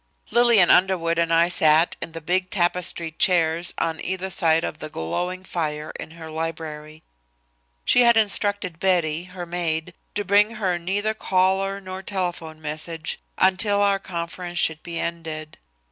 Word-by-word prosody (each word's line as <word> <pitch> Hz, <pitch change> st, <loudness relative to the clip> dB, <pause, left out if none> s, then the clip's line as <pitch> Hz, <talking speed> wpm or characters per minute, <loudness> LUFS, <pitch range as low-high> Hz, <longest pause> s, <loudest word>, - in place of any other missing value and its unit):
Lillian 235 Hz, -7 st, +5 dB
Underwood 175 Hz, -3 st, +3 dB
and 165 Hz, 0 st, +1 dB
I 165 Hz, +1 st, +5 dB
sat 160 Hz, -1 st, +3 dB
in 165 Hz, -, -6 dB
the 165 Hz, -, -6 dB
big 185 Hz, +3 st, 0 dB
tapestried 175 Hz, -3 st, -1 dB
chairs 170 Hz, -1 st, +3 dB
on 165 Hz, -1 st, -2 dB
either 190 Hz, +1 st, -3 dB
side 165 Hz, -1 st, +3 dB
of -, -, -4 dB
the 155 Hz, -, -6 dB
glowing 180 Hz, -, -3 dB
fire 155 Hz, -4 st, -3 dB
in -, -, -7 dB
her 160 Hz, -1 st, -9 dB
library. 155 Hz, -1 st, -6 dB, 0.8 s
She 250 Hz, -, +5 dB
had 235 Hz, -1 st, +5 dB
instructed 205 Hz, -4 st, +1 dB
Betty, 175 Hz, -3 st, +1 dB
her 180 Hz, -1 st, -8 dB
maid, 170 Hz, -1 st, -2 dB, 0.2 s
to 205 Hz, 0 st, -2 dB
bring 205 Hz, +4 st, +3 dB
her 185 Hz, -5 st, -1 dB
neither 200 Hz, +5 st, -1 dB
caller 195 Hz, 0 st, +1 dB
nor 185 Hz, -1 st, -7 dB
telephone 175 Hz, -5 st, -4 dB
message, 155 Hz, +1 st, -4 dB, 0.2 s
until 200 Hz, +2 st, +3 dB
our 200 Hz, -1 st, +3 dB
conference 175 Hz, -1 st, -6 dB
should 160 Hz, -2 st, +1 dB
be 170 Hz, -1 st, -5 dB
ended. 160 Hz, -2 st, -5 dB
175 Hz, 150 wpm, -23 LUFS, 160-190 Hz, 0.8 s, Lillian